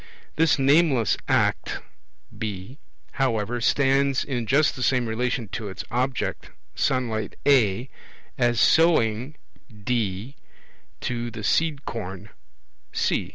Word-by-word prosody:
This 160 0 +3
nameless 140 - +3
act - - +1 0.6
(B), 105 +3 -6 0.3
however, 120 -3 -1
stands 135 +1 +2
in 120 -5 -3
just 140 +5 +3
the 130 - -7
same 125 0 +2
relation 120 +1 -1
to 105 -1 -5
its 95 - -6
object, 125 +2 -2 0.2
sunlight 110 -5 -1
(A), 120 -4 +3 0.5
as 120 -2 +1
sowing 135 -5 +3 0.4
(D) 110 +2 -3 0.6
to 120 -1 -3
the 110 -2 -8
seed 150 +3 +1
corn 95 -2 -6 0.6
(C). - - 0
120 Hz, 110 wpm, -24 LUFS, 110-135 Hz, 0.6 s, This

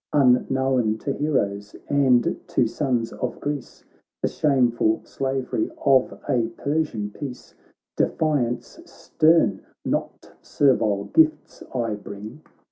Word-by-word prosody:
Unknown 130 -3 +2
to 140 +5 -3
heroes 105 -10 -1
and 135 -4 +3
to 125 - +2
sons 120 -1 -1
of 125 -1 -4
Greece 145 -2 -5 0.4
The - - +2
shameful 120 -6 +2
slavery 135 -4 -2 0.2
of 135 -2 +3
a 120 -3 +1
Persian 140 -9 -1
peace; 130 +1 -8 0.4
Defiance 140 -7 0
stern, 160 +1 +2 0.2
not - - -3
servile 105 -8 +2
gifts 320 -1 +2
I 115 -3 0
bring. 105 +6 -9
130 Hz, 105 wpm, -23 LUFS, 115-145 Hz, 0.4 s, and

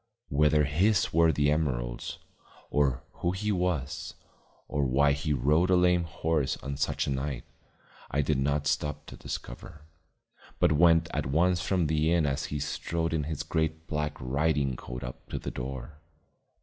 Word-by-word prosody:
Whether 75 +1 +4
his 90 +7 +2
were 80 0 +5
the 75 0 +2
emeralds, - - -2 0.5
or 65 -4 +1 0.2
who 85 +1 +1
he 105 +3 -1
was, 90 -8 -2 0.5
or 75 - 0
why 70 +2 +3
he 70 +2 -1
rode 75 +7 +3
a 95 - +5
lame 90 -1 +3
horse 80 -3 -1
on 70 0 -3
such 70 - 0
a - - -2
night, 65 -2 -2 0.7
I 70 +1 +1
did 75 -1 +1
not 70 +2 0
stop 75 -1 -1
to - - -10
discover, - - -8 0.7
but - - +3
went 80 +1 +5
at - - -1
once 85 +5 +2
from 90 -2 +1
the 80 +1 +1
inn 85 -3 +3
as 70 0 -1
he 75 - -3
strode 80 +3 -2
in 75 -3 0
his 80 -1 -3
great 80 0 -1
black 75 -1 -2
riding 70 +1 0
coat 60 +2 -7
up 60 0 -8
to - - -3
the - - -5
door. 65 +3 -6
75 Hz, 165 wpm, -29 LUFS, 70-80 Hz, 0.7 s, were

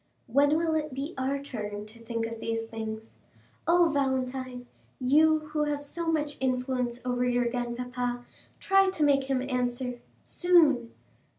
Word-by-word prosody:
"When 285 +5 +3
will 325 -1 +1
it 305 -3 -1
be 285 +5 -4
our 265 +1 -1
turn 210 -7 -5
to 220 +2 -13
think 230 0 -2
of 230 0 -6
these 225 0 -2
things? 220 0 -7 0.5
Oh, 340 -1 +5
Valentine, 260 -2 -1 0.3
you 305 +4 +3
who 300 -1 +1
have 290 -1 -2
so 330 +3 -2
much 295 -2 -1
influence 250 -2 -1
over 245 0 0
your 245 0 +2
grandpapa, 245 0 -3 0.3
try 390 0 +4
to 315 -5 -1
make 275 -2 +4
him 265 -1 0
answer—Soon." 250 +3 +1
255 Hz, 140 wpm, -28 LUFS, 245-295 Hz, 0.5 s, Oh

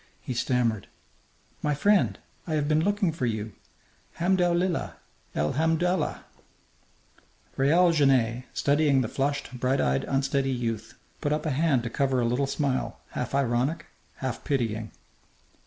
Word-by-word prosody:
He 130 - -5
stammered: 120 -3 0 0.7
"My 150 -1 0
friend! 200 +6 +3 0.3
I 160 - -1
have 145 -1 0
been 155 +1 +2
looking 205 -2 +1
for 140 -6 -2
you! 110 -2 -3 0.6
Hamdou 180 0 +2
lillah! 180 -1 -1 0.4
El 75 +1 +1
hamdou'llah!" 165 +5 0 1.3
Raoul 170 +6 +4
Genet, 130 -6 +2
studying 145 -1 +2
the 120 - -1
flushed, 140 0 -2
bright 130 +2 +1
eyed, 65 +1 +1
unsteady 135 0 0
youth, 115 -3 -3 0.3
put 145 - 0
up 150 +1 -1
a 155 - 0
hand 140 -3 +2
to 120 - -4
cover 135 -1 +1
a 120 - +1
little 125 +4 +1
smile, 135 -2 -1
half 125 +2 -3
ironic, 140 +4 0 0.3
half 130 -3 -4
pitying. 115 -5 -1
135 Hz, 140 wpm, -27 LUFS, 120-155 Hz, 1.3 s, Raoul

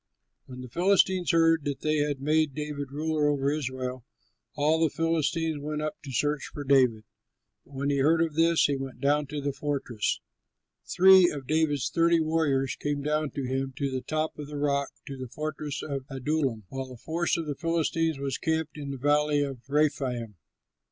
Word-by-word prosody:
When 125 -1 -9
the 125 - -8
Philistines 185 +4 +2
heard 165 -2 +4
that 140 -2 -3
they 155 0 +1
had 145 -2 0
made 155 0 +1
David 150 -2 -4
ruler 155 +1 0
over 140 -1 +1
Israel, 130 -3 -3 0.5
all 155 +2 +2
the 160 - +4
Philistines 165 -1 0
went 150 +1 -3
up 155 - -4
to 140 - -8
search 145 +2 0
for 145 - -6
David; 130 -6 +3 0.6
but 145 - -16
when 140 +1 -1
he 140 - +1
heard 160 +4 +4
of 165 -2 +1
this 165 +1 +4
he 145 - +1
went 135 -2 -6
down 145 +2 +2
to 150 +1 -4
the 140 0 -2
fortress. 135 -7 -2 0.7
Three 190 -1 +7
of 140 -3 -6
David's 150 -2 +1
thirty 170 +1 +3
warriors 155 -4 +1
went 145 -1 -1
down 150 0 0
to 140 - -2
him 135 +1 -2
to 140 -1 -1
the 130 0 -2
top 155 +1 -2
of 145 - -6
the 150 0 -6
rock, 140 -1 0 0.2
to 140 - -6
the 130 -1 -6
fortress 150 +1 -4
of 140 -3 -4
Adullam, 135 -4 -1
while 135 -1 -5
a 125 - -9
force 165 +8 -1
of 165 - -3
the 150 - -2
Philistines 165 0 0
was 135 -1 -3
camped 160 -1 -1
in 140 -1 -5
the 135 - -4
Valley 145 +2 +2
of 135 -3 -5
Rephaim. 135 -6 0
145 Hz, 190 wpm, -27 LUFS, 135-155 Hz, 0.7 s, Three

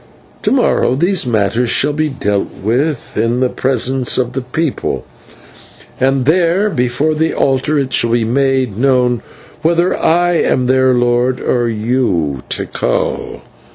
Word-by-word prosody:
To - - 0
morrow 245 - +2
these 175 0 +1
matters 115 +1 0
shall 145 +5 +2
be 155 +1 0
dealt 105 -7 -2
with 130 +6 -1
in 115 +3 0
the 130 -1 +1
presence 130 -1 -1
of 125 -1 -1
the 135 - -2
people, 135 +4 -3 0.9
and 135 0 +1
there, 180 +6 +2
before 125 +4 0
the 160 +1 -1
altar, 135 +3 +1
it 135 -2 -1
shall 115 - +2
be 120 -1 +2
made 130 -2 0
known 125 -3 +2 0.4
whether 170 +3 +2
I 175 +1 +2
am 130 -5 +1
their 130 0 +3
lord, 120 +1 +1
or 120 -2 0
you, 105 - -1
Tikal. - - -2
130 Hz, 140 wpm, -15 LUFS, 120-150 Hz, 0.9 s, their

